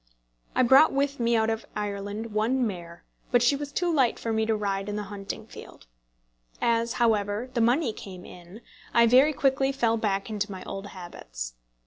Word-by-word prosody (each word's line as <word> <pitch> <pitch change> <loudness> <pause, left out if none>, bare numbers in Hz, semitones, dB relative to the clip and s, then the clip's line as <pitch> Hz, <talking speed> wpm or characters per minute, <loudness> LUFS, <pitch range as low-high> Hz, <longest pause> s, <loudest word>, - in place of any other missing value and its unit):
I - - +4
brought 265 +6 +7
with 280 0 -1
me 235 0 +2
out 220 0 +2
of 225 0 -3
Ireland 205 +2 -4
one 240 +4 +1
mare, 175 -5 -6 0.3
but 245 -1 +4
she 250 +4 +4
was 285 0 -5
too 345 +3 0
light 265 -6 +2
for 230 - -3
me 220 0 0
to 225 - +2
ride 200 -1 -2
in 205 - -3
the 210 - -3
hunting 195 -1 -6
field. - - -13 0.7
As, 230 0 +1
however, 220 0 0
the 235 - +1
money 245 +2 +2
came 185 -3 -10
in, 180 +5 -12 0.3
I 235 0 +7
very 260 +6 +6
quickly 270 -1 +1
fell 230 -4 +1
back 200 -3 -1
into 210 -2 -3
my 190 - -7
old 195 +1 -6
habits. 175 - -8
225 Hz, 185 wpm, -27 LUFS, 200-250 Hz, 0.7 s, brought